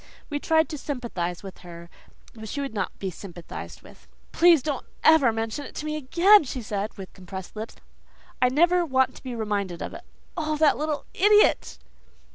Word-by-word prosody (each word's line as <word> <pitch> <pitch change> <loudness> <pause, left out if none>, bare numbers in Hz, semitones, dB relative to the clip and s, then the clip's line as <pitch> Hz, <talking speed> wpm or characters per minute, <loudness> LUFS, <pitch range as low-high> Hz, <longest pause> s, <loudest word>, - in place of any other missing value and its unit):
We 290 - -1
tried 320 +1 +2
to 300 - -6
sympathize 225 - -4
with 195 -1 -10
her 170 -1 -11 0.5
but 220 -1 -9
she 285 - -4
would 275 -4 -4
not 200 -4 -3
be 190 -1 -4
sympathized 175 -1 -9
with. - - -17 0.2
"Please 335 -5 +5
don't 290 -4 -3 0.2
ever 315 -7 +6
mention 225 +5 -3
it - - -11
to 300 - -5
me 305 0 -2
again," 345 +8 +5
she 255 -2 -6
said, 210 0 -4
with 190 -2 -9
compressed 190 0 -9
lips. 220 +1 -7 0.7
"I 250 - +5
never 345 +6 +3
want 265 -5 +1
to - - -14
be 255 -2 -5
reminded 200 -5 -2
of - - -6
it. - - -9 0.3
Oh, 310 -3 -2
that 305 -1 +4
little 300 0 -3
IDIOT!" 415 +2 +4
255 Hz, 185 wpm, -25 LUFS, 200-305 Hz, 0.7 s, ever